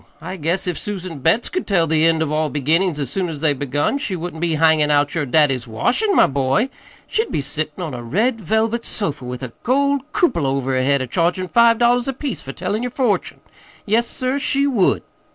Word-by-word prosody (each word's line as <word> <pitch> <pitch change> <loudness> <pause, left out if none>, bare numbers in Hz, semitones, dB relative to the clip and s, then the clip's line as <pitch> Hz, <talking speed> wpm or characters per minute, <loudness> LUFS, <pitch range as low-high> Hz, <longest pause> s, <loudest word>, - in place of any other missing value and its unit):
I 185 +3 -6
guess 170 +2 -1
if 180 -3 -2
Susan 185 -6 -6
Betts 165 - +2
could 370 - -4
tell 180 -5 +3
the 160 0 +2
end 160 -1 +2
of 155 - -3
all 155 0 0
the - - -12
beginnin's 165 +4 +1
as 140 -4 -3
soon 185 +2 -1
as 155 -3 -6
they're 150 -1 +2
begun, 145 - -1
she 200 -9 -2
wouldn't 170 -1 -6
be 170 -2 +1
hangin' 155 -1 +3
out 145 -1 +2
your 150 -4 -1
daddy's 135 -3 +2
washin', 250 - 0
my - - +6
boy. 135 - +1 0.4
She'd 445 +1 -1
be - - 0
sittin' 155 +4 -4
on 155 -5 -5
a 120 - -5
red 215 - 0
velvet 220 +4 0
sofa 150 -11 -4
with 125 +1 -6
a 120 -2 -6
gold 280 +2 +1
cupola 205 - +1
over 135 -1 -1
her 130 - +2
head 140 0 +2
a - - -3
chargin' 175 +6 0
five 235 -1 +5
dollars 240 +1 +2
apiece 270 -1 -4
for 135 - -7
tellin' 185 - -3
yer 250 - -2
fortune. 245 -4 -1 0.4
Yes, 230 +3 +2
sir, 255 +2 -1
she 280 0 +1
would!" 240 -10 +2
170 Hz, 220 wpm, -20 LUFS, 145-230 Hz, 0.4 s, my